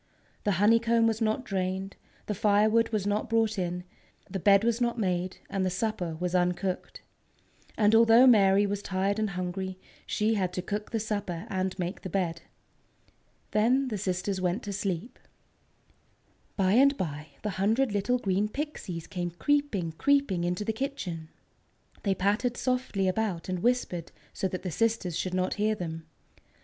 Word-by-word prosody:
The 205 - +3
honeycomb 230 +4 +4
was 225 0 +1
not 220 +3 0
drained, 190 -1 -2 0.3
the 210 - -2
firewood 215 +3 +3
was 215 -3 -1
not 205 +1 -1
brought 225 -2 +1
in, 180 0 -2 0.4
the 195 - -4
bed 200 +2 +5
was 235 +1 +1
not 240 0 +1
made, 185 -3 -1
and 195 -1 -1
the 185 - +1
supper 185 -4 -2
was 180 0 -2
uncooked. 180 +1 -1 0.7
And 210 0 +4
although 230 +2 +7
Mary 200 -4 +6
was 200 0 -2
tired 195 +2 -1
and 215 -1 0
hungry, 185 +1 -4 0.3
she 215 +1 +1
had 185 -4 -1
to 180 - -3
cook 210 +2 -4
the 225 - -1
supper 205 -4 -3
and 190 0 -1
make 180 +1 -3
the 190 - -6
bed. 170 -2 -1 1.1
Then 255 +5 +2
the 215 - -2
sisters 185 +1 -2
went 180 +5 0
to 205 - -4
sleep. 195 +4 -3 1.4
By 190 -2 +3
and 275 +5 +5
by, 150 -4 -4 0.2
the 210 - -1
hundred 225 +5 +2
little 205 +5 +1
green 200 -2 0
Pixies 215 - -5
came 180 -3 -3
creeping, 205 - 0
creeping 280 -11 +2
into 180 +4 -1
the 220 - 0
kitchen. 195 - -4 0.7
They 195 -2 +1
pattered 210 +6 0
softly 250 -7 0
about 185 -3 -1
and 185 -1 -1
whispered 215 -7 0 0.2
so 190 - -1
that 185 0 -5
the 185 - -3
sisters 225 -3 0
should 185 +2 -2
not 185 0 0
hear 215 +1 +2
them. 165 -4 -6
200 Hz, 160 wpm, -28 LUFS, 185-225 Hz, 1.4 s, although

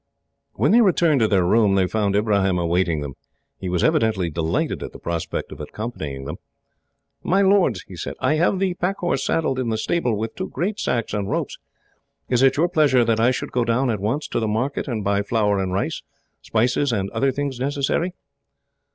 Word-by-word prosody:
When - - +1
they 235 +3 +6
returned 170 - +3
to 110 - +3
their 95 -4 +2
room, 105 +1 +3
they 95 -1 +3
found 100 +1 0
Ibrahim 100 -3 +2
awaiting 85 -2 +1
them. 70 -2 -5 0.5
He 95 - -4
was 90 -1 0
evidently 110 - +2
delighted 80 +1 -1
at - - -6
the - - -9
prospect 85 -1 -4
of - - -9
accompanying 75 - -6
them. - - -5 0.8
"My 195 +3 +2
lords," 190 - +3
he - - -10
said, - - -5
"I - - +2
have 170 +5 +2
the 190 -1 0
pack 180 +2 -2
horse 175 -6 -1
saddled 135 -5 0
in 125 -3 -1
the 110 - 0
stable, 120 -2 0
with 110 +1 -3
two 185 - -5
great 200 +4 -2
sacks 115 -4 -1
and 100 -2 -2
ropes. - - -2 0.7
Is 125 -1 +2
it 135 0 +4
your 165 +4 +3
pleasure 145 -8 +3
that 115 -1 +1
I 115 +2 +4
should 130 - -3
go 125 - +1
down, 120 +2 +1
at 105 - -2
once, 115 +10 -2
to - - -1
the 110 - -1
market 125 +7 -1
and 115 -5 -3
buy 100 0 +1
flour 105 -1 +1
and 95 -1 -2
rice, 95 +2 -2 0.4
spices, 125 +5 +1
and 100 -3 -1
other 135 +4 +1
things 140 -1 -3
necessary?" 145 +6 -1
115 Hz, 205 wpm, -22 LUFS, 100-145 Hz, 0.8 s, they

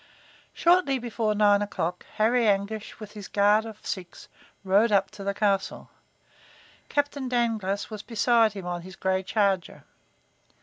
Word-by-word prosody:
Shortly 345 -6 +3
before 230 -3 -2
nine 205 -1 +4
o'clock, 180 -4 -3
Harry 230 +2 +2
Anguish, 205 +1 -1
with 215 -2 -9
his 205 -3 -9
guard 205 +2 +3
of 220 -2 -11
six, 180 -3 -6 0.3
rode 200 +4 +3
up 200 -1 +2
to 210 -2 -9
the 200 0 -2
castle. 200 -2 -1 1.0
Captain 285 -2 -1
Dangloss 220 -5 -1
was 215 -2 -6
beside 230 -1 +2
him 195 -3 -7
on 175 -1 -4
his 185 +2 -11
gray 190 0 0
charger. 195 -2 -1
210 Hz, 140 wpm, -26 LUFS, 195-230 Hz, 1.0 s, nine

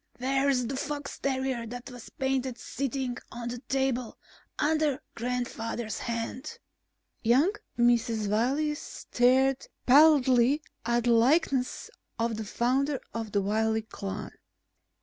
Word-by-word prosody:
Where 270 +2 +1
is 250 -3 +2
the 265 +4 -3
fox 290 0 -4
terrier 260 -3 -1
that 245 +3 -7
was 245 -2 -10
painted 265 -2 -1
sitting 265 -2 -3
on 235 0 -5
the 245 0 -5
table 260 -2 -1 0.4
under 305 -2 +1
Grandfather's 235 -2 -3
hand?" 235 - -4 0.6
Young 260 - +4 0.3
Mrs. 235 -3 +2
Wiley 265 +9 +1
stared 265 -2 +1 0.2
pallidly 275 -1 +5 0.2
at 240 0 +2
the 240 - +3
likeness 255 +2 +2 0.3
of 230 -1 -1
the 220 - -4
founder 265 +6 0
of 225 -2 -4
the 200 -1 +1
Wiley 220 +2 +1
clan. 200 -2 -6
250 Hz, 120 wpm, -28 LUFS, 235-270 Hz, 0.6 s, pallidly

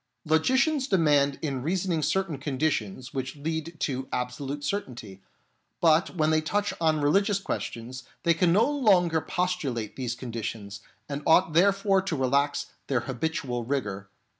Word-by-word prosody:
Logicians 260 - +2
demand 145 - +3
in 135 -4 -2
reasoning 175 +2 0
certain 170 -1 0
conditions 130 -4 -2
which 135 +1 -4
lead 160 +2 -4
to 130 -2 -2
absolute 135 +3 -3
certainty, 120 - -4 0.6
but 165 +2 +3
when 155 -2 +2
they 155 0 +3
touch 205 +6 -1
on 155 -2 +2
religious 195 +7 +3
questions, 125 -9 -5 0.2
they 170 -2 +4
can 170 +1 +2
no 215 +7 +4
longer 190 - +3
postulate 150 - -2
these 125 -3 -3
conditions, 115 -4 -6 0.3
and 140 0 -4
ought 165 0 +5
therefore 195 +2 +3
to 180 -3 -3
relax 140 +2 0 0.2
their 130 -4 +1
habitual 130 -1 -3
rigour. 105 -7 -3
150 Hz, 140 wpm, -27 LUFS, 130-180 Hz, 0.6 s, ought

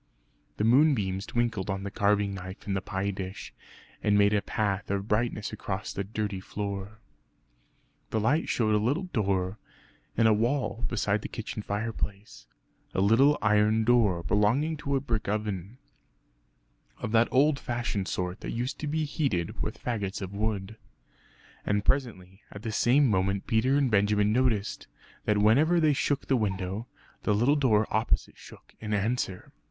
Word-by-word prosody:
The - - 0
moonbeams 110 -7 +3
twinkled 115 -5 -1
on 95 0 -2
the 100 - -5
carving 100 0 +1
knife 95 0 -8
and 100 - -1
the 95 - -1
pie 95 +2 -2
dish, 95 -1 -7 0.5
and 105 -1 +3
made 100 0 +4
a 105 - +2
path 100 -3 -2
of 100 +1 -2
brightness 105 -1 -1
across 100 -1 -4
the 100 - -2
dirty 105 -1 -3
floor. 100 +1 -5 1.1
The 110 - 0
light 140 +9 +1
showed 110 -3 +1
a 105 - +3
little 135 - 0
door 100 - -1 0.6
in 115 - +4
a 110 - +6
wall 120 +2 0
beside 105 -2 0
the - - -5
kitchen 110 -1 -6
fireplace 100 - -5 0.5
a - - +1
little 115 +9 +5
iron 105 +1 +3
door 110 -7 +3
belonging 120 - +2
to 140 -1 -2
a - - +2
brick 115 -5 -2
oven, 105 0 -3 1.2
of - - -4
that 115 +1 +4
old 140 +2 +3
fashioned 120 -6 -2
sort 90 0 -3
that - - -6
used 125 +3 -3
to 150 - -3
be 155 +1 0
heated 135 - -2
with - - -3
faggots 105 -5 -3
of 95 0 -6
wood. 105 0 -2 0.9
And 105 0 0
presently 100 -8 -1
at 100 - -10
the 115 - -3
same 130 +6 +4
moment 95 -2 0
Peter 125 +4 +2
and 135 -4 +2
Benjamin 105 0 +3
noticed 115 -4 0 0.4
that 105 -1 +2
whenever 140 +12 +4
they 155 -2 +4
shook 140 0 0
the 135 - +2
window 100 +1 -2 0.3
the 105 - +1
little 120 +8 +3
door 110 -7 +3
opposite 110 +2 0
shook - - -15
in 110 -1 -2
answer. 105 -3 -2
105 Hz, 160 wpm, -28 LUFS, 100-120 Hz, 1.2 s, a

